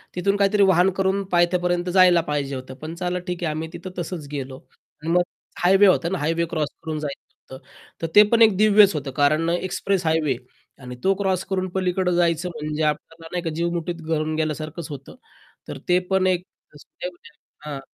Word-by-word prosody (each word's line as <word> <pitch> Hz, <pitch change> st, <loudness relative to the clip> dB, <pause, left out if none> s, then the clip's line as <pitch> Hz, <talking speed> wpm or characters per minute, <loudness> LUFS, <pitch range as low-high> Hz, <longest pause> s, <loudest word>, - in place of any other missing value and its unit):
तिथून 195 Hz, +3 st, +1 dB
काहीतरी 200 Hz, 0 st, +3 dB
वाहन 190 Hz, 0 st, +4 dB
करून 195 Hz, +1 st, +1 dB
पायथ्यापर्यंत 175 Hz, 0 st, +1 dB
जायला 180 Hz, -2 st, +6 dB
पाहिजे 140 Hz, -2 st, -2 dB
होतं, 130 Hz, 0 st, -7 dB
पण 160 Hz, +1 st, -6 dB
चला 180 Hz, 0 st, -2 dB
ठीक 180 Hz, 0 st, -4 dB
आहे, 165 Hz, -, 0 dB
आम्ही 160 Hz, +1 st, -4 dB
तिथं 180 Hz, +2 st, -8 dB
तसंच 170 Hz, -3 st, -5 dB
गेलो. 135 Hz, -2 st, -5 dB, 0.4 s
आणि 160 Hz, +2 st, -2 dB
मग 180 Hz, -, +5 dB, 0.4 s
हायवे 195 Hz, +3 st, +6 dB
होता 175 Hz, -2 st, +3 dB
ना, 190 Hz, -, -2 dB
हायवे 165 Hz, +3 st, 0 dB
क्रॉस 155 Hz, -3 st, -1 dB
करून 155 Hz, -2 st, -3 dB
जायचं 140 Hz, -2 st, -9 dB
होतं. 130 Hz, -, -14 dB, 0.4 s
तर 165 Hz, -, -1 dB
ते 210 Hz, -, +10 dB
पण 230 Hz, 0 st, +3 dB
एक 220 Hz, -3 st, +6 dB
दिव्यच 210 Hz, -1 st, +6 dB
होतं, 140 Hz, -2 st, -4 dB
कारण 155 Hz, +4 st, +2 dB
अ, 170 Hz, -, +1 dB
एक्सप्रेस 185 Hz, +1 st, -1 dB
हायवे 155 Hz, -5 st, +1 dB, 0.5 s
आणि 125 Hz, 0 st, -7 dB
तो 195 Hz, -, +4 dB
क्रॉस 190 Hz, -2 st, 0 dB
करून 185 Hz, -1 st, -1 dB
पलीकडं 185 Hz, -1 st, 0 dB
जायचं, 170 Hz, 0 st, +1 dB
म्हणजे 155 Hz, +1 st, -2 dB
आपल्याला 165 Hz, +2 st, -3 dB
नाही 180 Hz, 0 st, -3 dB
का 165 Hz, -, -2 dB
जीव 170 Hz, +1 st, 0 dB
मुठीत 170 Hz, 0 st, -4 dB
घालून 155 Hz, -1 st, -1 dB
गेल्यासारखंच 155 Hz, +1 st, -3 dB
होतं. 140 Hz, -, -9 dB, 0.5 s
तर -, -, -6 dB
ते 180 Hz, 0 st, +5 dB
पण 190 Hz, -1 st, +2 dB
एक 180 Hz, -1 st, +1 dB, 0.3 s
रिस्कच 150 Hz, -, -11 dB
होती 175 Hz, 0 st, -18 dB, 0.4 s
हां. 145 Hz, -2 st, -5 dB
170 Hz, 195 wpm, -23 LUFS, 155-185 Hz, 0.5 s, ते